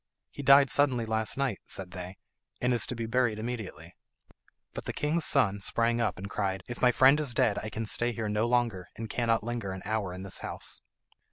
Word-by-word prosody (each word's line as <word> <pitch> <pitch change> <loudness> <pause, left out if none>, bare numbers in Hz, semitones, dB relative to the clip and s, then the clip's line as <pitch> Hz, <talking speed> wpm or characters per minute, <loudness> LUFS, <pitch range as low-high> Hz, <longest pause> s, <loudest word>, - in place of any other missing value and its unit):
"He - - -7
died 140 0 +6
suddenly 130 -5 +3
last 110 +1 0
night," 135 -7 -1
said 95 -2 -4
they, 90 +1 -8 0.4
"and 125 0 +1
is 120 - +2
to 125 - -4
be 115 -1 -3
buried 115 -1 +1
immediately." 110 -7 -6 0.8
But - - -7
the - - -3
king's 155 +3 0
son 105 -8 +3
sprang 115 +3 +1
up, 105 -6 0
and 95 +2 -6
cried, 95 -2 -2
"If 120 - -7
my 125 - +5
friend 135 +4 +5
is 140 -6 -2
dead 105 -3 +2
I 110 - -5
can 110 +1 -4
stay 120 +3 +1
here 115 -2 -3
no 105 +2 0
longer, 120 -7 0
and 110 -1 -6
cannot 115 -2 +1
linger 120 -3 -3
an 95 - -8
hour 105 -3 -1
in 95 +1 -7
this 95 - -6
house." - - -4
115 Hz, 210 wpm, -29 LUFS, 100-125 Hz, 0.8 s, died